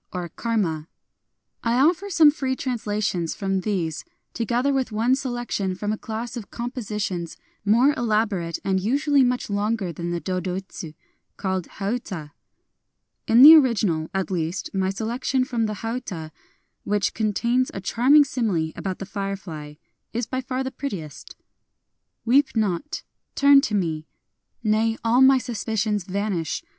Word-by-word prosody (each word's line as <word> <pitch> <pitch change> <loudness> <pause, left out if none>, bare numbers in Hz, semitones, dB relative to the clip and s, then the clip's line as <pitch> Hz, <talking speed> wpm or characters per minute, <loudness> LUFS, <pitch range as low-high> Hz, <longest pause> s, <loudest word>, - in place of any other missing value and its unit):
I 180 -1 -4 1.4
offer 305 +12 +2
some 325 -5 +6
free 265 -3 -2
translations 210 - -2
from 195 -1 -1
these, 180 -6 -2 0.3
together 240 +4 0
with 265 -3 0
one 225 +4 +2
selection 240 -7 -2
from 205 +3 -2
a - - -3
class 225 +3 -5
of 230 -4 -7
compositions 210 -8 -4 0.3
more 235 +8 +4
elaborate 210 -8 0
and 190 -1 +2
usually 280 +7 +2
much 250 0 0
longer 205 -2 -1
than 170 +2 -4
the 175 0 -2
dodoitsu, 185 -1 -4 0.4
called 190 -3 -2
hauta. 195 -7 -4 1.0
In 235 +3 +7
the 310 +3 +13
original, 210 - +3
at 195 -1 -2
least, 170 +1 -3
my 190 -1 0
selection 235 +6 -1
from 235 -4 -1
the 215 - -3
hauta 225 -9 -5 0.3
— - - -48
which 205 -1 +1
contains 235 +4 +1
a - - -5
charming 260 +9 +5
simile 205 - -1
about 190 -2 -4
the 195 - -6
firefly 190 -7 -5 0.2
— - - -51
is 235 +1 -1
by 260 +3 -3
far 255 +1 -3
the 265 - -4
prettiest: 195 - -7 0.5
— - - -54
Weep 265 +4 +3
not! 215 - -1 0.2
— - - -54
turn 280 0 +6
to 225 -7 -1
me!... 160 -5 -1 0.6
Nay, 220 +1 +2
all 235 +3 +3
my 265 0 +7
suspicions 220 -4 -2
vanish 190 -5 -2
215 Hz, 145 wpm, -24 LUFS, 190-250 Hz, 1.4 s, the